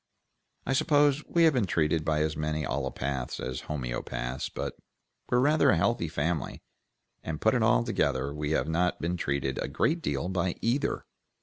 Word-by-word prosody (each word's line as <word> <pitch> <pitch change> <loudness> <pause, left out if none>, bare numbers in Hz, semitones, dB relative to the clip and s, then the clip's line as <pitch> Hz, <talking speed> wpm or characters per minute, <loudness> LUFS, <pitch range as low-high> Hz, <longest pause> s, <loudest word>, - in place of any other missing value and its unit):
I 135 - 0
suppose 145 0 +3
we 170 - +3
have 160 -2 +6
been 120 -7 +1
treated 80 -2 +1
by 75 -1 +1
as 80 0 -1
many 75 0 -2
allopaths 65 -1 -3
as 65 0 -4
homoeopaths, 60 -2 -4
but - - -3 0.5
we're 125 - +3
rather 150 +5 +4
a - - +4
healthy 90 0 +1
family, 80 +1 -2 0.6
and 80 -2 -4
put - - +3
it - - +2
all - - +4
together 65 +3 0
we 75 0 -3
have 80 - +1
not 85 +2 +1
been 85 +2 -1
treated 70 -5 -1
a - - -2
great - - 0
deal 70 +2 -1
by 90 -1 -1
either." 125 +5 0
80 Hz, 175 wpm, -28 LUFS, 70-95 Hz, 0.6 s, have